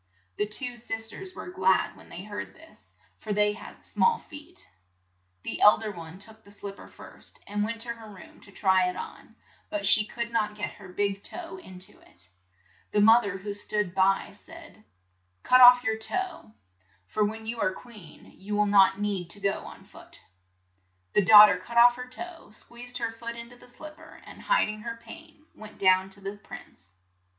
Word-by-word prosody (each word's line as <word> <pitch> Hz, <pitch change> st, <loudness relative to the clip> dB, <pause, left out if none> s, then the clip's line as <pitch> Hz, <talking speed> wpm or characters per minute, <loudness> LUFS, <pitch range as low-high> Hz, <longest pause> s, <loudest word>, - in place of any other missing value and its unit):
The 210 Hz, -, 0 dB
two 245 Hz, +3 st, 0 dB
sis 225 Hz, -1 st, -2 dB
ters 375 Hz, -2 st, -8 dB
were -, -, -8 dB
glad 190 Hz, -, +2 dB
when -, -, -17 dB
they 180 Hz, -, -8 dB
heard 205 Hz, 0 st, -7 dB
this, 320 Hz, 0 st, -19 dB, 0.3 s
for 215 Hz, -, -7 dB
they 210 Hz, 0 st, +3 dB
had -, -, -11 dB
small 465 Hz, -1 st, +2 dB
feet. 315 Hz, +4 st, -13 dB, 0.8 s
The -, -, -5 dB
eld 210 Hz, +2 st, +6 dB
er 215 Hz, -, -3 dB
one 165 Hz, -2 st, -10 dB
took 220 Hz, +2 st, -10 dB
the 200 Hz, -, -18 dB
slip 200 Hz, 0 st, -8 dB
per -, -, -12 dB
first, -, -, -15 dB
and 205 Hz, +1 st, -2 dB
went 230 Hz, +1 st, -3 dB
to 235 Hz, -, -2 dB
her 225 Hz, -2 st, -13 dB
room 200 Hz, -3 st, -14 dB
to 200 Hz, -, -16 dB
try 190 Hz, -2 st, +2 dB
it 180 Hz, -, -6 dB
on, -, -, -9 dB, 0.3 s
but 205 Hz, -1 st, -3 dB
she 215 Hz, +2 st, +6 dB
could 235 Hz, +2 st, -5 dB
not 210 Hz, -2 st, 0 dB
get 210 Hz, -, -3 dB
her 195 Hz, -, -13 dB
big 200 Hz, +1 st, -1 dB
toe 350 Hz, -, -5 dB
in 190 Hz, -, -12 dB
to 190 Hz, +3 st, -7 dB
it. 85 Hz, +1 st, -22 dB, 0.6 s
The 210 Hz, -, +2 dB
moth 225 Hz, +3 st, +6 dB
er 195 Hz, -1 st, -4 dB
who 200 Hz, +2 st, -6 dB
stood 205 Hz, -2 st, -2 dB
by, 195 Hz, +1 st, +2 dB
said, -, -, -9 dB, 0.6 s
"Cut 245 Hz, -1 st, +8 dB
your 220 Hz, -1 st, -1 dB
toe 220 Hz, -, +1 dB
off, 375 Hz, -, -5 dB, 0.5 s
for 210 Hz, -, -1 dB
when 220 Hz, +2 st, -3 dB
you 230 Hz, +1 st, -5 dB
are 185 Hz, -, +2 dB
queen 210 Hz, -5 st, -14 dB
you 205 Hz, +2 st, -7 dB
need 205 Hz, -, -1 dB
not 195 Hz, -1 st, +5 dB, 0.4 s
go 200 Hz, 0 st, +1 dB
on -, -, -12 dB
foot." -, -, -16 dB, 0.9 s
The -, -, +4 dB
daugh 210 Hz, +1 st, +11 dB
ter 200 Hz, -3 st, +1 dB
cut 235 Hz, +5 st, -7 dB
off 240 Hz, +1 st, +8 dB
her 250 Hz, 0 st, -7 dB
toe, 340 Hz, +7 st, -8 dB
squeezed 240 Hz, +3 st, -6 dB
her 230 Hz, -2 st, -2 dB
foot 230 Hz, +1 st, -7 dB
in 235 Hz, 0 st, -10 dB
to -, -, -13 dB
the 245 Hz, -, -16 dB
slip 305 Hz, +5 st, -10 dB
per, 320 Hz, 0 st, -15 dB
and -, -, -12 dB
hid -, -, +2 dB
ing 215 Hz, 0 st, -6 dB
her 230 Hz, +1 st, -6 dB
pain, 310 Hz, +5 st, -14 dB
went 215 Hz, 0 st, -13 dB
down 185 Hz, 0 st, +3 dB
to 195 Hz, +1 st, -7 dB
the 195 Hz, +1 st, -6 dB
prince. 95 Hz, -, -11 dB
215 Hz, 200 wpm, -27 LUFS, 200-240 Hz, 0.9 s, daugh